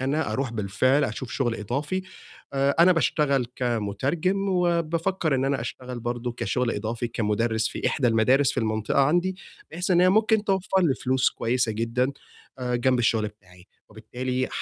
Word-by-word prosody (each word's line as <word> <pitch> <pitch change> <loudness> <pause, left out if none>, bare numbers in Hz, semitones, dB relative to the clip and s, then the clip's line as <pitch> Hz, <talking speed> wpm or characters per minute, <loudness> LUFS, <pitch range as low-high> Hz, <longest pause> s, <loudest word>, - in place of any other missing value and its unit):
أنا 145 +4 -1
أرُوح 130 -3 -2
بالفعل 115 +7 +1
أشوف 120 +2 -5
شغل 120 -3 0
إضافي، 145 - -3 0.5
آآ، 140 0 +1
أنا 180 +2 +7
باشتغل 145 -5 +1
كمترجم، 125 - -1
وبافكّر 170 -2 0
إن 130 0 +1
أنا 135 -1 0
أشتغل 125 +1 -6
برضه 120 +1 -3
كشغل 120 +2 -1
إضافي، 115 +3 -3
كمُدرِّس 110 0 0
في - - -4
إحدى 130 -4 +1
المدارس 125 +5 +3
في - - -1
المنطقة 110 +3 0
عندي، 175 +6 +2 0.3
بحيث 180 +4 -3
إن 175 -1 +5
هي 180 - +5
ممكن 220 +2 +3
توفّر 190 -1 +1
لي 150 -6 +3
فلوس 130 0 +1
كويسة 120 0 0
جدًا 115 +4 -1 0.5
آآ، 125 -1 -1
جنب 125 +1 +2
الشغل 110 -2 +1
بتاعي، 90 -3 -20 0.2
وبالتالي 125 +4 -3
130 Hz, 155 wpm, -25 LUFS, 115-155 Hz, 0.5 s, أنا